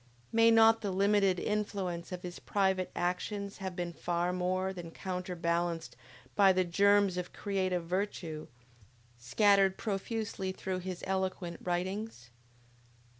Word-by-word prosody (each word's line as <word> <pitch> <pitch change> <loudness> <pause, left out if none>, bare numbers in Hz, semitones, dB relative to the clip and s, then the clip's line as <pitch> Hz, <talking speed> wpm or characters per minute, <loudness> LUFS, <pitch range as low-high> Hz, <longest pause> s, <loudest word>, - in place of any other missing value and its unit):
May 230 0 +5
not 225 0 +6
the 205 - -2
limited 195 0 +3
influence 195 -5 -2
of 180 -1 -6
his 175 -1 -7
private 190 -2 0
actions 200 +3 -2
have 190 -2 -5
been 175 -1 -3
far 175 +1 -1
more 185 +1 -1
than 175 -3 -7
counterbalanced 175 -2 -2 0.4
by 195 -2 +6
the 185 0 +2
germs 200 +1 +3
of 180 -1 -4
creative 185 -4 -1
virtues, 175 -4 -3 0.7
scattered 195 - +3
profusely 205 -2 -3
through 185 0 -4
his 185 -1 -6
eloquent 190 -2 -2
writings? 180 - -3
185 Hz, 125 wpm, -32 LUFS, 175-200 Hz, 0.7 s, not